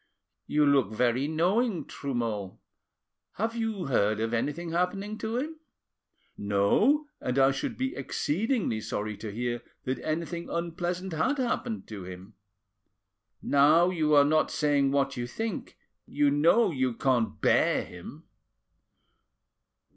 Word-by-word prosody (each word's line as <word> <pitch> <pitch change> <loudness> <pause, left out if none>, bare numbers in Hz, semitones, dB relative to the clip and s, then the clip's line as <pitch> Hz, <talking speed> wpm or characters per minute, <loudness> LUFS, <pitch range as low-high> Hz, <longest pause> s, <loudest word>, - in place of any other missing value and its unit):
"You 150 0 +3
look 135 -7 +3
very 125 +4 +1
knowing, 180 +6 +1
Trumeau: 115 -8 -4 0.8
have 225 +3 -2
you 225 -5 -2
heard 110 -5 +1
of 115 +1 -1
anything 150 +8 -2
happening 195 +5 -1
to 225 +1 -2
him?" 310 +4 -4 0.8
"No, 105 - +2
and 125 +1 -2
I 135 0 +5
should 135 - -4
be 265 +1 -2
exceedingly 190 - -1
sorry 105 0 -3
to 105 0 -6
hear 120 +2 -3 0.2
that 130 -1 -2
anything 170 +2 -3
unpleasant 175 +2 -3
had 260 - +1
happened 240 -3 -2
to 105 -3 -7
him." 95 +3 -10 1.1
Now 155 +6 +5
you 155 -4 +2
are 145 0 +7
not 155 +2 +2
saying 145 -2 +2
what 135 -1 0
you 120 0 -3
think, 220 - -5 0.3
you 145 -1 +2
know 165 +10 +4
you 130 -4 -1
can't 120 -4 0
bear - - +3
him." - - -11
145 Hz, 130 wpm, -28 LUFS, 120-185 Hz, 1.1 s, are